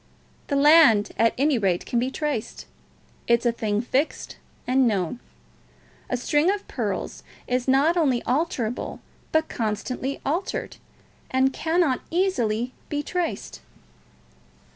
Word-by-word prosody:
The 285 - -1
land, 280 -7 +6
at 230 0 +2
any 275 -1 +2
rate, 185 -4 0
can 240 - 0
be 250 +2 0
traced. 290 -5 -4 0.6
It 235 0 +4
is - - -11
a 240 - +4
thing 215 -2 -1
fixed 265 +5 -2 0.3
and 255 0 +3
known. 200 +1 -1 0.9
A 250 - 0
string 295 +7 +2
of 405 +1 -2
pearls - - -3 0.2
is 250 0 -1
not 280 +6 +4
only 275 -8 +2
alterable, 250 -4 -2 0.3
but 315 0 +2
constantly 250 +5 -3
altered, 340 +7 -2 0.5
and 265 +1 +2
cannot 325 -5 +1
easily 255 - 0 0.2
be 295 0 -2
traced." 355 +1 -3
260 Hz, 125 wpm, -24 LUFS, 235-310 Hz, 0.9 s, land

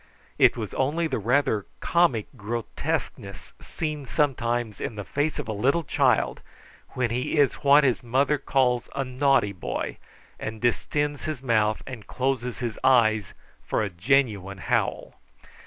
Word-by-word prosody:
It - - +5
was - - -5
only 150 +6 0
the 160 - -1
rather 115 -2 +1
comic 170 -11 +2
grotesqueness 105 -3 -4
seen 150 -4 -4
sometimes 120 -7 -1
in 115 - -4
the 105 - -5
face 145 +7 -1
of - - -4
a - - -2
little 135 +11 +1
child 130 -5 +1 0.5
when 125 -3 -1
he 125 +5 -1
is 145 -2 +4
what 145 +1 +6
his 125 -8 +2
mother 135 +5 +1
calls 125 -3 +1
a 140 - 0
naughty 130 -5 +2
boy, 90 - -4 0.4
and 110 0 -5
distends 145 +4 -1
his 155 -5 -4
mouth 110 -3 +1
and 125 -5 -9
closes 125 -2 -2
his 120 -4 -4
eyes 110 -6 +3 0.3
for - - -1
a 100 - -3
genuine 100 -1 +1
howl. - - -1
125 Hz, 145 wpm, -25 LUFS, 110-140 Hz, 0.5 s, what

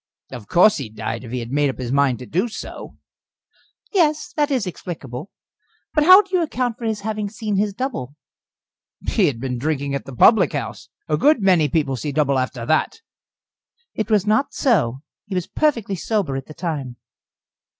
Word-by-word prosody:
"Of 120 -6 -9
course 210 +5 +5
he 135 -6 -5
died, 110 +2 -5
if 115 - -9
he 125 -1 -2
had 115 +1 -7
made 145 0 +2
up 130 - -5
his 125 -2 -4
mind 140 -3 +2
to 125 - -9
do 185 - 0
so." 220 - -8 1.0
"Yes 310 -6 +1
that 295 -1 +1
is 260 -7 0
explicable. 160 -5 -7 0.6
But 300 -1 +3
how 370 +4 +9
do 380 -1 -4
you 360 - +3
account 250 -7 -2
for 235 - -5
his 220 -2 -1
having 210 -1 -3
seen 215 -1 -3
his 205 +1 +1
double?" 195 - -4 0.9
"He - - +3
had 125 -5 -2
been 125 -1 -3
drinking 140 0 -1
at 140 - -3
the 135 - -9
public 185 - +5
house. - - -5 0.2
A 150 - +1
good 295 - +4
many 175 -6 +4
people 140 -2 0
see 145 +4 -4
double 140 -2 +1
after 130 -2 -3
that." 155 - 0 0.9
"It 220 0 -3
was 210 -3 +3
not 215 +6 +1
so. 145 - +1 0.2
He 195 - -4
was 180 -2 -1
perfectly 235 -10 0
sober 190 -7 -1
at 135 -1 -5
the 155 - -11
time." 145 -8 -4
165 Hz, 190 wpm, -21 LUFS, 135-220 Hz, 1.0 s, how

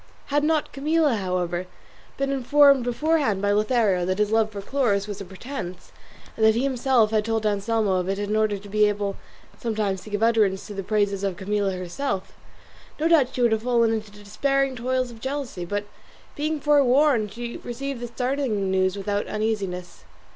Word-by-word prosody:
Had 290 0 +3
not 310 0 +1
Camilla, 305 0 +2
however, 180 -2 -2 0.5
been 275 0 -1
informed 275 0 +5
beforehand 270 -3 +1
by 205 +1 +1
Lothario 210 -3 +2
that 185 +1 -1
this 210 0 +1
love 220 -1 +3
for 205 - -6
Chloris 205 -3 0
was 205 -1 -6
a - - -6
pretence, 185 -1 -7 0.4
and 220 - -2
that 220 0 +6
he 240 - 0
himself 255 -4 +2
had 215 -1 +2
told 225 0 -1
Anselmo 210 -1 +1
of 180 0 -2
it 195 - -1
in 205 +1 -2
order 215 -1 +1
to 200 +1 -12
be 210 +1 +3
able 205 -1 -2 0.4
sometimes 210 -5 -1
to 215 - -11
give 205 +1 -1
utterance 215 -4 +2
to 210 - -8
the 195 - -4
praises 200 -1 0
of 195 -3 -1
Camilla 200 0 -1
herself, 185 +4 -4 0.7
no 315 - +2
doubt 290 -6 +3
she 250 - +1
would 235 - +4
have 220 -1 +1
fallen 235 -1 +2
into 215 -1 -3
the 205 0 -15
despairing 275 +5 0
toils 255 +1 -1
of 225 -1 -13
jealousy; 265 -9 -4
but 205 +3 -3 0.5
being 305 +1 -1
forewarned 280 -5 +3
she 235 +2 -6
received 265 +2 -5
the 240 - -5
startling 240 -5 -1
news 185 0 +1
without 205 +1 -2
uneasiness. 200 -5 -3
220 Hz, 185 wpm, -24 LUFS, 200-260 Hz, 0.7 s, that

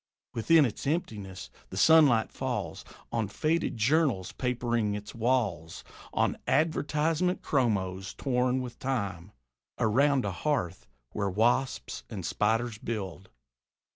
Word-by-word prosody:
Within 155 +6 +5
is 120 +3 -4
emptiness: 105 - -3 0.2
the 95 - -7
sunlight 140 -4 +5
falls - - -3 0.3
On 115 -3 0
faded 155 +4 -1
journals 125 - +2
papering 120 -4 -1
its 105 0 -7
walls; 115 -9 -1 0.3
On - - 0
advertisement 160 +3 +1
chromos, 95 -8 0
torn 125 -1 0
with 125 -1 -8
time, 100 -8 -3 0.5
Around 130 +4 +3
a 100 - -1
hearth 95 - -2 0.2
where 100 -1 -1
wasps 115 - 0
and - - -5
spiders 115 +1 0
build. 95 -6 -5
120 Hz, 110 wpm, -29 LUFS, 100-140 Hz, 0.5 s, Within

